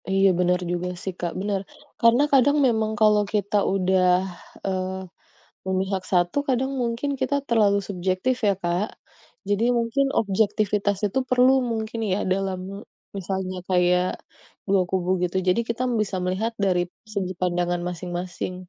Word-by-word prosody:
Iya 195 0 +4
benar 180 0 +2
juga 175 0 -2 0.2
sih, 190 - -3
Kak, 175 -1 -2
benar. 200 -1 -1 0.4
Karena 235 +4 +5
kadang 280 +2 +5
memang 220 -2 +1
kalau 210 -1 +5
kita 205 0 0 0.2
udah, 185 -1 +2 0.6
eee, 185 -1 -1 0.7
memihak 190 0 -1
1 175 +2 +2
kadang 265 +1 +1
mungkin 235 +4 -1
kita 260 +2 0
terlalu 210 -4 +3
subjektif 185 +6 0
ya, 200 - +5
Kak. 175 +4 0 0.6
Jadi 205 +2 +1
mungkin 235 +4 +1 0.2
objektivitas 205 0 +1
itu 200 - -2
perlu 255 +1 +5 0.2
mungkin 220 0 -3
ya, 190 - +1
dalam 190 -1 -1
m 200 0 -7 0.4
misalnya 190 0 -3
kayak, 180 -1 +3 0.6
2 195 -1 +4
kubu 185 -1 0
gitu. 180 +1 -2
Jadi 180 +5 +3
kita 235 +1 -2
m - - -1
bisa 195 -2 -3
melihat 190 +6 -1
dari 180 -2 +2 0.3
segi 185 -2 -1
pandangan 175 -1 0
masing-masing. 180 +1 -5
195 Hz, 145 wpm, -24 LUFS, 185-220 Hz, 0.7 s, Karena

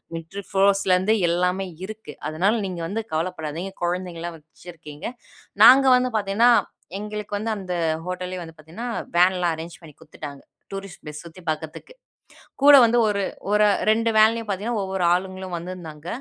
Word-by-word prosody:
மில்ட்டரி 180 +5 -7
போர்ஸ்லருந்து 195 +1 +3
எல்லாமே 180 +2 0 0.2
இருக்கு. 215 -7 -9 0.2
அதனால 185 +8 +1
நீங்க 175 -2 -5
வந்து 220 +4 -3
கவலப்படாதீங்க, 165 +2 -3
கொழந்தைகளெல்லாம் 175 -1 -3
வச்சிருக்கீங்க. 160 0 -12 0.6
நாங்க 270 +2 +9
வந்து 250 0 0
பாத்தீங்கன்னா, 210 +4 +3 0.5
எங்களுக்கு 210 0 -5
வந்து 225 +1 -2
அந்த 185 -2 -5 0.3
ஹோட்டலே 180 0 -4
வந்து 165 -1 -12
பாத்தீங்கன்னா, 180 +11 -7 0.3
வேன்லாம், 180 -1 +3
அரேஞ்ச் 165 +1 -9
பண்ணி 155 -3 -14
குடுத்துட்டாங்க. 145 -2 -10 0.3
டூரிஸ்ட் 195 -2 -8
பிளேஸ் 150 -1 -8
சுத்தி 170 +2 -13
பாக்றதுக்கு. 155 - -5 0.7
கூட 290 +1 +8
வந்து 235 +1 +3
ஒரு, 200 -1 0 0.3
ஒரு 210 0 +4 0.2
2 230 +1 +3
வேன்லையும் 225 +1 +4
பாத்தீங்கன்னா 210 +3 -2
ஒவ்வொரு 190 -1 -2
ஆளுங்களும் 185 0 -3
வந்துருந்தாங்க. 165 -3 -8
185 Hz, 135 wpm, -23 LUFS, 165-210 Hz, 0.7 s, நாங்க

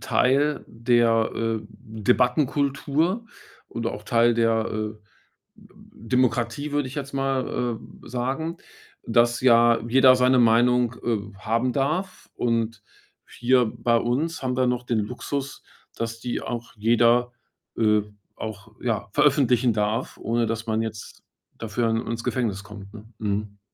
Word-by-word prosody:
Teil 140 +3 +1
der, 115 -1 +2
äh, 115 -1 -1 0.2
Debattenkultur 140 - 0 0.4
und 115 -1 -4
auch 105 -2 -4
Teil 115 +2 +3
der, 115 -1 +2
äh, 110 0 -3 0.6
D - - -21 0.4
Demokratie, 125 +3 0
würde 145 -3 0
ich 135 - -10
jetzt 140 -1 -5
mal, 130 -3 -1
äh, - - -15
sagen, 135 +8 -3 0.5
dass 120 0 +3
ja 120 -2 +5
jeder 130 +1 +6
seine 125 0 +4
Meinung, 120 +1 +4
äh, 105 -3 -2
haben 115 +4 0
darf 160 +8 -2
und 115 -2 -1 0.5
hier 125 0 +2
bei 115 +2 0
uns 140 +9 -1
haben 125 -1 -1
wir 130 - +2
ja 125 - +3
noch 125 0 -1
den 115 -3 0
Luxus, 135 +5 -5 0.3
dass 115 0 -4
die 120 0 -3
auch 120 0 -5
jeder 120 +2 +3 0.4
äh, 105 -1 +3 0.4
auch, 110 0 -8
ja, 115 -5 -1
veröffentlichen 130 -4 +3
darf, 105 +1 -2
ohne 115 0 0
dass 115 0 -3
man 110 0 0
jetzt 110 -2 -7 0.4
dafür 115 +1 -1
ins 115 +1 -2
Gefängnis 105 -6 -2
kommt, 105 -1 -11
ne? 110 -1 -10
Mhm. 105 -1 -3
120 Hz, 135 wpm, -24 LUFS, 115-130 Hz, 0.6 s, jeder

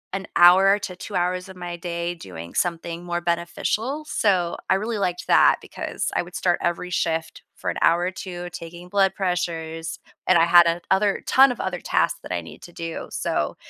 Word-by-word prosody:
an 195 - -5
hour 190 +3 +7
to 185 -3 -6
2 195 +2 -8
hours 180 +1 -1
of 190 - -10
my 175 -1 -6
day 170 0 -3
doing 85 - -10
something 170 0 -2
more 175 0 -2
beneficial, 210 - -2
so 185 -5 +1
I 190 - +5
really 215 +2 -2
liked 180 -2 -2
that, - - +6
because - - -4
I - - +2
would 175 +1 -11
start 175 -1 +1
every 175 +1 -2
shift 165 -2 -2
for - - -4
an - - -3
hour 170 +1 +4
or 180 +1 -1
2 175 -1 -7
taking 175 +1 -9
blood 195 -1 +2
pressures, 170 -3 -3 0.3
and 185 - +6
I 165 - +5
had 170 0 +7
a 170 +1 0
other 200 +1 +2
ton 270 +1 +6
of 245 - -6
other 180 -2 -3
tasks - - 0
that - - -10
I 85 - -1
needed 80 - -12
to 175 - -12
do. 165 -1 -6
So, - - -2
175 Hz, 200 wpm, -23 LUFS, 170-190 Hz, 0.3 s, hour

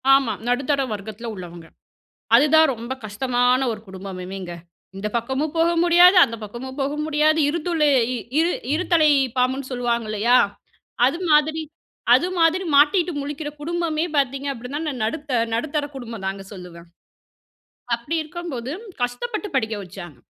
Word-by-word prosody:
ஆமா. 255 -6 +1
நடுத்தர 275 +3 +1
வர்க்கத்துல 215 +3 -6
உள்ளவங்க. 175 -2 -9 0.7
அதுதான் 310 +4 +6
ரொம்ப 235 +3 -5
கஷ்டமான 245 +4 +1
ஒரு 215 -1 -6
குடும்பமுமேங்க 190 -1 -7 0.5
இந்த 210 +2 -3
பக்கமும் 265 +6 -1
போக 330 +1 +4
முடியாது, 350 +2 +7
அந்த 230 - -6
பக்கமும் 260 +6 -8
போக 280 +2 -1
முடியாது 310 +1 +2
இரு 340 +3 -1
துளை 320 -4 +2 0.5
இரு 340 +2 +3 0.2
இருத்தலை 330 -2 +3 0.3
பாம்புன்னு 260 +1 0
சொல்லுவாங்க 240 -2 -1
இல்லையா? 230 +4 +3 0.7
அது 275 +6 +1
மாதிரி 310 +1 +3 0.5
அது 355 - +4
மாதிரி 330 +3 +3
மாட்டிட்டு 325 +5 +4
முழிக்கிற 295 +1 -5
குடும்பமே 335 0 -1
பார்த்தீங்க 275 0 0
அப்டின்னா 255 +4 -6
நான் 260 -6 -4
நடுத்த 270 0 -2 0.2
நடுத்தர 290 +3 -1
குடும்பம் 230 -6 -7
தாங்க 195 0 -4
சொல்லுவேன். 175 -3 -11 1.1
அப்டி 260 +8 -5
இருக்கம் 345 +1 -7
போது 245 +2 -5 0.3
கஷ்டப்பட்டு 420 - -2
படிக்க 220 -4 0
வச்சாங்க. 175 -6 -10
265 Hz, 135 wpm, -22 LUFS, 225-310 Hz, 1.1 s, முடியாது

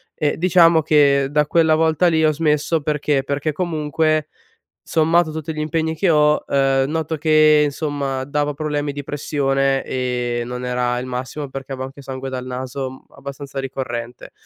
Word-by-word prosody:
e 150 -1 -1
diciamo 170 -2 +5
che 140 -3 +3
da 150 +1 +2
quella 160 -1 +3
volta 160 +2 +2
lì 160 -1 +3
ho 155 - +4
smesso, 150 +1 0
perché, 150 -2 0
perché 145 +3 -2
comunque 155 -2 0 0.6
sommato 165 0 +2
tutti 160 0 -5
gli 155 - -4
impegni 160 +1 -1
che 185 +1 +2
ho, 150 -1 +3
ehm, 135 0 +2
noto 160 0 -2
che, 155 0 +4
insomma, 140 -2 -2
dava 145 +1 -1
problemi 145 0 -2
di 145 0 -6
pressione 135 -1 0
e 125 -2 -2
non 125 +1 -6
era 125 0 0
il 125 - -5
massimo, 130 +3 -5
perché 135 0 -7
avevo 130 0 -4
anche 140 +1 -12
sangue 135 0 -6
dal 130 -1 -5
naso 130 +1 -5
abbastanza 140 0 -7
ricorrente. 125 -3 -6
145 Hz, 160 wpm, -20 LUFS, 135-155 Hz, 0.6 s, diciamo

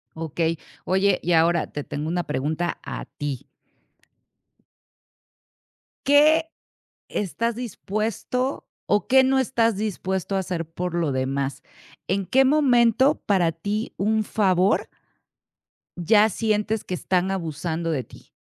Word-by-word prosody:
Okey. 165 +1 -1 0.3
Oye, 190 0 +2
y 175 - +1
ahora, 170 +1 +3
te 145 - -4
tengo 150 +2 -5
una 175 +1 -1
pregunta 155 +6 -2
a - - -6
ti. 140 -3 -5 2.6
¿Qué 310 +3 +4 0.6
estás 225 +4 -2
dispuesto, 235 +3 -3 0.2
o 205 - +1
qué 265 0 +6
no 265 0 +3
estás 230 -4 +1
dispuesto 190 -2 -2
a - - +2
hacer 175 -3 -3
por 175 +1 -4
lo 165 -4 0
demás? 135 +1 -2 0.4
¿En 195 +1 0
qué 265 +7 +4
momento 265 -1 +3
para 180 -5 +2
ti 205 +7 -3
un 215 +2 +1
favor? 190 -2 +2 1.1
¿ya 210 +5 +4
sientes 215 +1 -1
que 185 - -6
están 185 +1 0
abusando 165 -2 -3
de 135 -5 -1
ti? - - -17
190 Hz, 120 wpm, -24 LUFS, 165-225 Hz, 2.6 s, qué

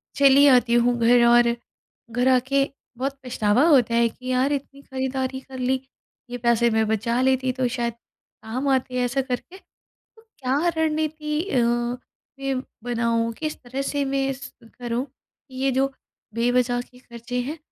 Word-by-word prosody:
चली 280 0 +6
आती 245 -3 +5
हूँ 240 0 +3
घर, 235 +1 +5
और 235 0 +5 0.6
घर 245 +2 +1
आके 270 +2 +2 0.3
बहुत 275 +2 -3
पछतावा 230 +1 +2
होता 245 -7 +4
है 235 0 +4
कि 255 +3 -12
यार, 260 +3 +2
इतनी 280 0 -5
खरीदारी 265 0 -3
कर 265 -1 -10
ली, 260 +1 +1 0.5
ये 245 - -4
पैसे 235 0 +2
मैं 220 -1 +2
बचा 230 +3 0
लेती 260 0 +2
तो 255 -1 0
शायद 235 -1 -2 0.5
काम 250 +5 -3
आते, 260 -1 0
ऐसा 255 +2 0
करके। 265 +8 -5
तो - - -28 0.4
क्या 280 - -3 0.2
रणनीति 310 -1 -1
अ, - - +1 0.8
मैं 270 -1 -1 0.2
बनाऊँ, 230 -1 0
किस 310 -1 -3
तरह 260 +3 -4
से 285 +1 -1
मैं 270 0 0
इस 270 0 -6 0.3
करूँ 240 +2 -2
कि 265 0 -22
ये 270 - +3
जो 270 +2 +1 0.4
बेवज़ह 245 +1 +1
के 250 0 -17
खर्चे 240 0 -6
हैं, 295 +6 -5
255 Hz, 160 wpm, -23 LUFS, 240-275 Hz, 0.8 s, चली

